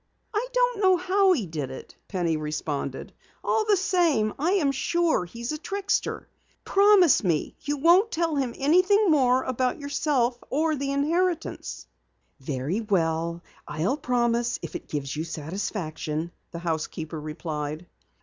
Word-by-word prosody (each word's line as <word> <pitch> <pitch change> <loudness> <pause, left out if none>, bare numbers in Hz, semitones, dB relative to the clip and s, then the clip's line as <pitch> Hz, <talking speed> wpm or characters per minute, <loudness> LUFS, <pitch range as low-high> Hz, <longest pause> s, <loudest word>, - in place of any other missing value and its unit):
"I 440 +4 0
don't - - +1
know 375 -2 +5
how 380 +2 +3
he 245 - -1
did 155 -5 -4
it," 130 - -10
Penny 175 -4 0
responded. 150 -3 -4 0.3
"All 440 - +1
the 410 - +5
same, 335 - +2
I 335 +6 +2
am 310 -9 +2
sure 335 - +1
he's 235 - -6
a 305 - -4
trickster. 400 +5 -2 0.4
Promise 395 - +5
me 165 -6 0
you 290 0 -2
won't 345 +9 +5
tell 330 -3 0
him 265 -4 -1
anything 365 +7 +4
more 260 -3 +4
about 255 +1 -1
yourself 275 -4 0
or 310 +3 +1
the 275 0 -2
inheritance." 330 +4 -1 0.5
"Very 140 - -2
well, 170 -4 0 0.2
I'll 180 - 0
promise 240 -3 0
if - - -6
it - - -6
gives 140 -2 -3
you 155 - -2
satisfaction," 160 -1 -4 0.2
the - - -7
housekeeper 160 -1 -4
replied. 150 +1 -5
250 Hz, 140 wpm, -26 LUFS, -, 0.5 s, know